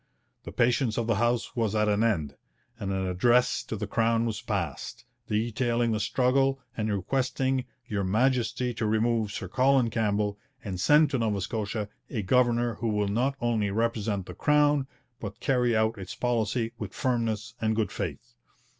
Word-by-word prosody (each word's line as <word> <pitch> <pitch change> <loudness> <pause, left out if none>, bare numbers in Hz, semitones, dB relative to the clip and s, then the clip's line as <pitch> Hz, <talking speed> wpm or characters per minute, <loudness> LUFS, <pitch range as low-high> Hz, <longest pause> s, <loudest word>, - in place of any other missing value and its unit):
The - - -6
patience 120 -1 +1
of 115 - 0
the 115 -3 +1
House 120 0 0
was 110 -3 0
at 105 0 +2
an 105 +1 +2
end, 80 -11 0 0.4
and 100 - -3
an 95 -1 -1
address 120 +7 +3
to - - -4
the 105 0 -3
Crown 115 +2 +1
was 110 -1 -3
passed, 105 - -4 0.2
detailing 115 +2 0
the 110 - 0
struggle 135 +5 +2 0.2
and 110 -1 -1
requesting 130 +5 0 0.2
'Your 100 -2 -2
Majesty 125 +4 +1
to 110 -1 -2
remove 110 0 +1
Sir 95 - -5
Colin 130 +3 +3
Campbell 105 -2 0 0.2
and 95 -4 -4
send 150 - +5
to 135 - 0
Nova 110 -3 0
Scotia 105 +1 -3 0.2
a 110 -5 -3
governor 120 +1 +2
who 115 - -1
will 105 -2 0
not 125 +7 +1
only 115 -4 0
represent 105 -2 -1
the - - -8
Crown, 145 -2 +3 0.3
but 100 -2 -7
carry 125 -4 +2
out 110 -1 +1
its 95 -1 -7
policy 115 -1 0
with 105 -4 -6
firmness 115 -3 -1
and 110 0 +1
good 110 -1 0
faith.' - - -5
115 Hz, 170 wpm, -27 LUFS, 105-125 Hz, 0.4 s, send